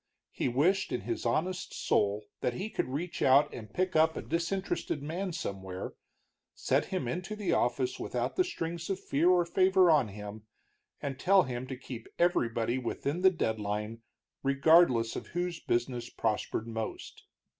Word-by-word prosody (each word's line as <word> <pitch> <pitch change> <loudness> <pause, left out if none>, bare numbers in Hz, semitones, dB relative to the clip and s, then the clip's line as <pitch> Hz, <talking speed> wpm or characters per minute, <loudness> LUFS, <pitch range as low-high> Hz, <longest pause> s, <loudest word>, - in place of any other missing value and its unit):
He - - -1
wished 175 +11 +2
in 125 - -1
his 115 +3 -3
honest 180 +10 -1
soul 105 +1 +1 0.2
that 120 - -1
he 210 - -4
could - - -1
reach 160 +7 -4
out 140 +3 +5
and 110 -3 -8
pick 185 +4 -1
up 160 0 +4
a - - -4
disinterested 170 -3 -2
man 180 +5 -3
somewhere, 95 - -5 0.6
set - - +1
him 185 -10 -3
into 185 - -3
the 210 -3 -1
office 375 +1 0
without - - -2
the 370 - +4
strings 170 - -4
of 195 - -1
fear 160 +6 +2
or 180 -1 +4
favor 185 0 +4
on 145 -7 +4
him, 105 +1 -9 0.6
and 140 -2 -3
tell 195 +1 +5
him 125 -1 -4
to 130 -1 -5
keep 125 -3 -8
everybody 120 -8 +1
within 140 +6 -3
the 190 - +7
deadline, 110 - -2 0.4
regardless 135 -4 +4
of - - -5
whose 175 -2 -1
business 120 -1 -1
prospered 110 0 -1
most. 115 -1 -6
140 Hz, 160 wpm, -30 LUFS, 115-180 Hz, 0.6 s, the